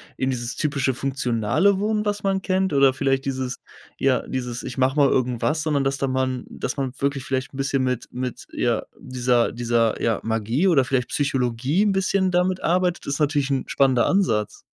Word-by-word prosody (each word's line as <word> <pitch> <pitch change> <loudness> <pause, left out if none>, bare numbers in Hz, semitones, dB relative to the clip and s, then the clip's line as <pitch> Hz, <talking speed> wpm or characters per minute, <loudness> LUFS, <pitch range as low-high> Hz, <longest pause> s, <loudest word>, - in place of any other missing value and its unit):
in 130 - -1
dieses 120 -2 -3
typische 140 -3 0
funktionale 135 - +1
Wohnen, 210 +1 0
was 205 0 -2
man 195 -1 0
kennt, 190 0 0
oder 140 -2 +4
vielleicht 135 0 0
dieses 130 -2 -3 0.4
ja, 135 -1 +2
dieses: 125 -1 -4
„Ich 125 - -6
mache 130 +1 +2
mal 145 -2 +4
irgendwas“, 130 +5 0
sondern 145 -3 +1
dass 135 0 0
da 135 - -1
man 130 -1 -1
dass - - -4
man 135 -2 -2
wirklich 140 -1 -1
vielleicht 130 +1 -3
'n - - -9
bisschen 135 -1 0
mit 125 -2 -2
mit, 125 -1 -5
ja, - - 0
dieser 125 -2 0
dieser, 115 -2 0
ja, 115 -3 0
Magie 115 - +1
oder 140 -7 +4
vielleicht 125 -2 -1
Psychologie 135 - 0
'n 210 - +2
bisschen 190 0 +1
damit 180 +1 +1
arbeitet 180 +1 +1
ist 140 +2 -2
natürlich 145 -2 +1
'n 135 -2 0
spannender 130 -3 +3
Ansatz. 115 - +1
135 Hz, 185 wpm, -23 LUFS, 125-155 Hz, 0.4 s, oder